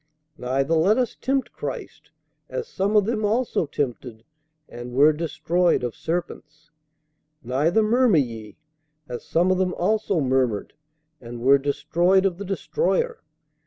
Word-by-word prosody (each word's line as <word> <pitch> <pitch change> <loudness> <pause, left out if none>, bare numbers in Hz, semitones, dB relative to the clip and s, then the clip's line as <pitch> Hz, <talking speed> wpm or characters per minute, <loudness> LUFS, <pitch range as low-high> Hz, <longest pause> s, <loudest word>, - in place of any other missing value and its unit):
Neither 135 +5 0
let 175 +7 +3
us 250 -3 0
tempt 270 +1 -1
Christ, - - -7 0.4
as 470 -2 -4
some 200 +3 -1
of 210 -2 +5
them 220 -1 -1
also 220 -5 0
tempted, 125 -5 -4 0.4
and 120 +1 -9
were 145 +4 +5
destroyed 170 +1 0
of 120 -2 -2
serpents. 160 -2 -5 0.7
Neither 150 - +1
murmur 235 -3 +3
ye, 115 -6 -3 0.5
as 120 -1 -6
some 175 +3 +1
of 185 - +1
them 185 -1 0
also 205 -1 0
murmured, 130 -6 0 0.5
and 120 0 -8
were 135 +3 +5
destroyed 170 +7 +1
of 185 -2 -1
the 200 - -5
destroyer. 465 - -1
165 Hz, 135 wpm, -23 LUFS, 130-205 Hz, 0.7 s, of